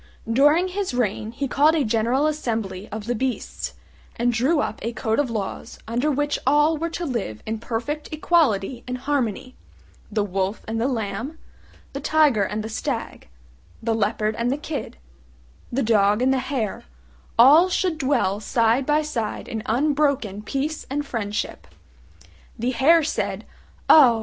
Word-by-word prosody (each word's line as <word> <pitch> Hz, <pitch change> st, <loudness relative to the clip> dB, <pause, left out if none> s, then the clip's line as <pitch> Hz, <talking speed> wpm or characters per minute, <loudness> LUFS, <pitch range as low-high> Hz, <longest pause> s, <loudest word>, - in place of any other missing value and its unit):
During 295 Hz, +10 st, +4 dB
his 370 Hz, -7 st, -3 dB
reign 220 Hz, -2 st, -1 dB
he 275 Hz, +4 st, -3 dB
called 295 Hz, +5 st, +4 dB
a 305 Hz, -, +2 dB
general 235 Hz, +5 st, +1 dB
assembly 225 Hz, -10 st, -2 dB
of 215 Hz, 0 st, -5 dB
the 240 Hz, -, 0 dB
beasts, 255 Hz, +2 st, -3 dB, 0.4 s
and 240 Hz, +1 st, +1 dB
drew 265 Hz, +8 st, +2 dB
up 220 Hz, -, -2 dB
a 230 Hz, +3 st, -3 dB
code 220 Hz, +1 st, -1 dB
of 285 Hz, -4 st, +1 dB
laws 210 Hz, -4 st, -5 dB
under 245 Hz, +6 st, 0 dB
which 290 Hz, 0 st, 0 dB
all 295 Hz, +3 st, +4 dB
were 330 Hz, +2 st, -2 dB
to 345 Hz, +1 st, -4 dB
live 225 Hz, -, -4 dB
in 220 Hz, 0 st, -3 dB
perfect 245 Hz, +7 st, -4 dB
equality 270 Hz, -, +1 dB
and 250 Hz, 0 st, -3 dB
harmony: 255 Hz, -2 st, -2 dB, 0.6 s
the 210 Hz, -1 st, +1 dB
wolf 195 Hz, +1 st, -2 dB
and 225 Hz, +1 st, -2 dB
the 245 Hz, -, +2 dB
lamb, 230 Hz, +4 st, -3 dB, 0.6 s
the 275 Hz, -, -4 dB
tiger 295 Hz, -6 st, +3 dB
and 210 Hz, +2 st, -1 dB
the -, -, -4 dB
stag, 220 Hz, -, -4 dB, 0.5 s
the 225 Hz, 0 st, -1 dB
leopard 215 Hz, 0 st, 0 dB
and 235 Hz, +1 st, 0 dB
the 275 Hz, -, 0 dB
kid, 295 Hz, 0 st, -5 dB, 0.7 s
the 265 Hz, +3 st, 0 dB
dog 210 Hz, 0 st, +3 dB
and 265 Hz, +1 st, +3 dB
the 265 Hz, -, +1 dB
hare, 235 Hz, -4 st, -3 dB, 0.5 s
all 295 Hz, +10 st, +7 dB
should 355 Hz, -3 st, 0 dB
dwell 255 Hz, -8 st, +1 dB
side 230 Hz, +3 st, +1 dB
by 300 Hz, +1 st, +3 dB
side 235 Hz, -8 st, -3 dB
in 220 Hz, -, -4 dB
unbroken 270 Hz, -5 st, +1 dB
peace 280 Hz, +7 st, -3 dB
and 290 Hz, +2 st, -2 dB
friendship. 210 Hz, -5 st, -4 dB, 0.9 s
The 240 Hz, +3 st, -1 dB
hare 310 Hz, +7 st, +5 dB
said, 305 Hz, -, -2 dB, 0.4 s
"Oh! 250 Hz, -7 st, +7 dB
250 Hz, 160 wpm, -23 LUFS, 220-290 Hz, 0.9 s, all